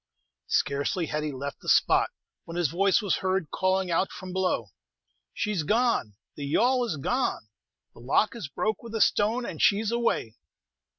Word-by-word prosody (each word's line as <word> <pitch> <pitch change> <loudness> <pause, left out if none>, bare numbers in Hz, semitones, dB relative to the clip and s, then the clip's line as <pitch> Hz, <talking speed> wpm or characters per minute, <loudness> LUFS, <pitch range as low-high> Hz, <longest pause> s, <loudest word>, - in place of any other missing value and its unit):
Scarcely 140 +5 0
had 150 0 -2
he 150 -1 -2
left 140 +1 -6
the - - -5
spot, - - +4 0.4
when 165 +1 -7
his 175 -5 +1
voice 195 - +2
was 200 - +1
heard 185 -4 -1
calling 185 -1 0
out 175 +3 +1
from 185 -1 -8
below, 185 - 0 0.6
"She's 210 -5 -1
gonel 220 - +1 0.2
the 145 - -6
yawl 245 - +2
is 210 -10 -3
gone! 140 - -1 0.4
the - - -16
lock 135 - +1
is 225 -10 -5
broke 210 +9 -2
with 230 -1 -8
a 220 - 0
stone, 225 +6 +2
and - - -5
she's 210 +2 +3
away!" 235 - -1
185 Hz, 170 wpm, -27 LUFS, 150-220 Hz, 0.6 s, spot